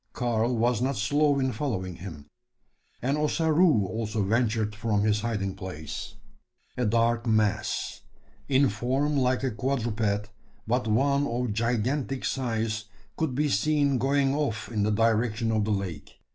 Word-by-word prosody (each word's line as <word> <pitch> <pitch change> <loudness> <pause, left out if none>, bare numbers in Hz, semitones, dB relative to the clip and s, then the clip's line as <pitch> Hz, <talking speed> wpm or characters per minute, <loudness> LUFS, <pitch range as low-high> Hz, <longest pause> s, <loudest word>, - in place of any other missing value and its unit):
Karl 120 0 0
was 120 0 +2
not 135 +2 0
slow 145 +7 +2
in 130 -1 +1
following 95 - -3
him; 80 -6 -9 0.8
and 140 +4 +1
Ossaroo 155 - +3
also 110 +2 -2
ventured 110 0 +1
from 105 -1 0
his 105 0 +2
hiding 105 -4 -2
place. 90 +2 -7 0.6
A 125 -3 0
dark 115 +2 +2
mass 110 -2 0 0.5
in 135 +1 +4
form 130 +8 0
like 130 -1 +1
a 130 - 0
quadruped, 110 -4 -1 0.3
but 120 +1 0
one 140 +6 +2
of 120 -2 -1
gigantic 125 +4 -1
size 110 -4 -1 0.3
could 155 -6 -1
be 150 +2 +2
seen 140 +3 +2
going 135 +1 +2
off 130 -7 -2
in 110 -3 -1
the 105 - +2
direction 115 +1 +1
of 110 -2 +1
the 110 - -1
lake. 95 -7 -4
115 Hz, 145 wpm, -27 LUFS, 105-135 Hz, 0.8 s, in